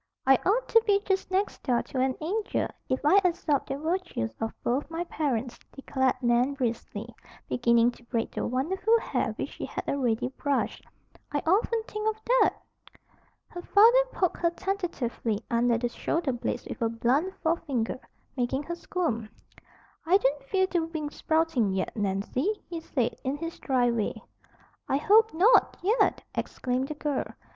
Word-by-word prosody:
"I 270 - +7
ought 460 +6 +2
to 455 - +6
be 400 -1 +4
just 385 -1 0
next 385 +2 -1
door 245 -2 +1
to 260 - -5
an 260 0 +1
angel, 410 +7 -1 0.2
if 260 +3 -1
I 390 +7 +6
absorbed 330 -5 +1
the 275 - -2
virtues 315 - -2
of 225 - -1
both 260 +6 0
my 330 +1 -3
parents," 260 -8 -2
declared 265 -1 0
Nan 245 +3 +2
briskly, 235 -3 -3 0.3
beginning 235 0 +3
to 240 - -18
braid 230 -1 -2
the - - -2
wonderful 380 - +1
hair - - -1
which - - -4
she - - -6
had - - -6
already 250 -3 0
brushed. 280 +1 -2 0.5
"I 290 - 0
often 440 +6 +2
think 425 0 -2
of 435 0 -4
that." - - +4 1.0
Her 350 - -7
father 460 +7 +6
poked 365 -3 0
her 340 - +2
tentatively 335 - -3
under 235 0 +3
the 240 +1 -1
shoulder 320 +4 -1
blades 245 -1 -3
with - - -7
a 230 - +2
blunt 260 +11 0
forefinger, 275 -8 -1 0.4
making 260 +2 -1
her 345 +4 -4
squirm. 310 -11 -2 0.7
"I 355 +4 +5
don't 285 -6 0
feel 375 +5 +2
the 350 -3 0
wings 315 -2 -4
sprouting 315 -11 +1
yet, 190 -1 -2
Nancy," 215 - -1
he 340 -1 -5
said, 250 -7 -1
in 265 +2 -1
his 330 +2 -6
dry 250 -3 +2
way. 225 -3 -2 0.7
"I 270 - +3
hope 435 +9 +5
not, 405 +9 +5
yet!" 435 +6 +2
exclaimed 255 +1 -2
the 305 - -5
girl. 295 -2 -2
285 Hz, 165 wpm, -28 LUFS, 245-365 Hz, 1.0 s, I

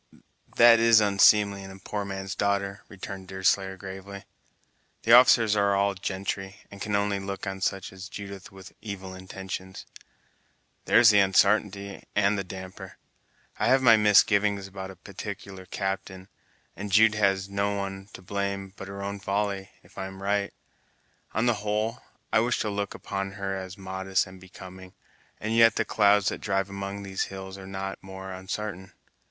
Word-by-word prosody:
"That 115 -1 +8
is 115 -1 +6
unseemly 100 -1 +4
in 95 - -9
a 95 - -10
poor 100 +2 -4
man's 95 -1 -5
darter," 100 -1 -1
returned 95 -1 -8
Deerslayer 95 0 0
gravely, 95 +1 -9 0.8
"the 115 - +4
officers 120 -3 +7
are 100 -1 +3
all 100 0 +2
gentry, 95 0 -4 0.2
and 100 -1 -11
can 105 -1 -1
only 100 -1 +1
look 95 0 -5
on 95 -1 -5
such 95 -1 -2
as 95 0 -9
Judith 100 -1 -8
with 95 -1 -13
evil 95 -3 -7
intentions." 95 0 -7 1.0
"There's 115 -2 +7
the 105 - +5
unsartainty, 100 +1 +2
and 100 0 +3
the 100 - -2
damper! 95 -1 -9 0.6
I - - +2
have 130 0 +4
my 115 -3 +8
misgivings 100 -1 +4
about 95 0 -7
a 95 - -10
particular 95 -1 -8
captain, 95 -1 -4 0.5
and 100 0 -6
Jude 110 +2 +6
has 95 -2 +1
no 100 +1 -1
one 95 0 -5
to 95 - -11
blame 100 0 -3
but 95 - -8
her 100 0 -7
own 100 0 -4
folly, 100 -1 -2
if - - -13
I'm 95 0 -6
right. 100 0 0 0.8
On 110 +3 +2
the 120 - +4
whole, 105 +3 -1 0.3
I - - +6
wish 120 +2 +1
to 105 - -1
look 100 -1 -3
upon 95 0 -4
her 100 -1 -3
as 95 -1 -7
modest 95 0 -1
and 95 0 -13
becoming, 95 0 -12 0.4
and 110 +2 -2
yet 115 0 +6
the - - 0
clouds 105 -1 +4
that - - -6
drive 95 -1 -1
among 100 0 -5
these 95 -1 -2
hills 95 0 -8
are 95 - -10
not 95 0 -5
more 95 0 -8
unsartain. 95 0 -6
100 Hz, 165 wpm, -27 LUFS, 95-100 Hz, 1.0 s, That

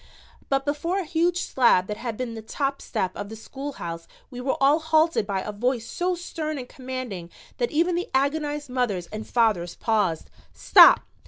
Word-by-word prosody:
But 275 0 +1
before 300 +6 -1
a 390 - -1
huge 340 +2 0
slab 235 -8 +3
that 210 +2 -5
had 230 -2 -5
been 250 -2 -4
the 225 - -7
top 275 +5 -3
step 185 -1 -2
of 205 0 -6
the 220 - -7
schoolhouse 220 -9 -7 0.2
we 250 -1 -7
were 265 +1 -1
all 280 +3 +4
halted 315 -6 +2
by 195 -2 -1
a 210 - -5
voice 235 +3 -1
so 360 0 -1
stern 315 -3 -4
and 250 -2 -6
commanding 255 -10 -6 0.3
that 485 - +1
even 340 +3 +1
the 350 +1 -2
agonized 290 +2 0
mothers 225 -9 -1
and 215 0 -6
fathers 210 -8 +1
paused. 205 -8 0 0.2
"Stop! - - +7
255 Hz, 180 wpm, -25 LUFS, 215-305 Hz, 0.3 s, Stop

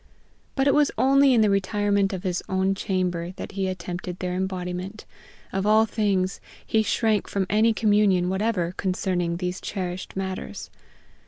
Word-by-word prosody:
But 270 - +1
it 280 - +5
was 295 -1 +4
only 275 +1 +5
in 235 -3 +4
the 215 - +4
retirement 200 0 +1
of 190 -1 -5
his 180 -2 -1
own 190 +1 +1
chamber 185 -3 -2
that - - -7
he 195 -1 -2
attempted 180 -1 -5
their 180 -1 -3
embodiment; 185 +2 -4 0.5
of 195 +1 -1
all 215 +1 +5
things, 200 -4 0 0.2
he 220 - +2
shrank 215 0 +1
from 195 -1 -1
any 220 +2 +4
communion 205 -5 +3
whatever 190 -2 0
concerning 180 -2 -1
these 180 0 -3
cherished 185 -2 -5
matters. 190 - -5
190 Hz, 155 wpm, -25 LUFS, 180-210 Hz, 0.5 s, it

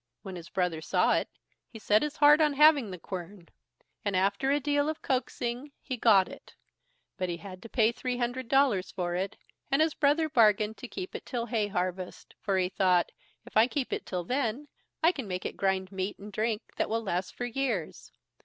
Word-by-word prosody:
When 190 -1 -7
his 170 -1 -9
brother 180 -5 -1
saw - - +2
it, - - 0 0.4
he 225 - -10
set 210 -1 +3
his 300 -1 -2
heart 295 +1 +7
on 300 -2 +3
having 290 -5 +5
the 185 - -6
quern, 180 0 -8 0.5
and, 205 -3 -1
after 200 +8 +1
a 285 +1 +3
deal 290 +1 +1
of 315 - -5
coaxing, 255 +1 -2
he 260 - -4
got 210 -5 +5
it; - - -13 0.6
but 185 -2 -2
he 170 - -3
had 185 0 -10
to 230 - -10
pay 225 -2 +3
three 250 +1 -3
hundred 245 +1 -2
dollars 250 -8 +3
for 175 -1 -3
it, 190 +2 -3 0.3
and 275 +1 +2
his 315 -1 +3
brother 300 +2 +2
bargained 220 -6 +3
to 250 - -8
keep 370 +9 -6
it - - -6
till 240 -3 -2
hay 220 -3 0
harvest, 185 -2 -4
for 195 -2 0
he 185 -1 +2
thought, 180 -1 +2 0.3
if - - -15
I 220 +2 +6
keep 265 -1 -2
it - - -4
till 180 -2 -3
then, 255 +5 -2 0.4
I 330 - +6
can 270 - -6
make 180 -1 -4
it - - -3
grind 190 -1 0
meat 190 +1 -3
and 205 +1 -11
drink 220 +1 -1
that - - 0
will 225 +1 -1
last 180 -2 -2
for 245 - -3
years. 240 - -3
220 Hz, 210 wpm, -29 LUFS, 190-270 Hz, 0.6 s, heart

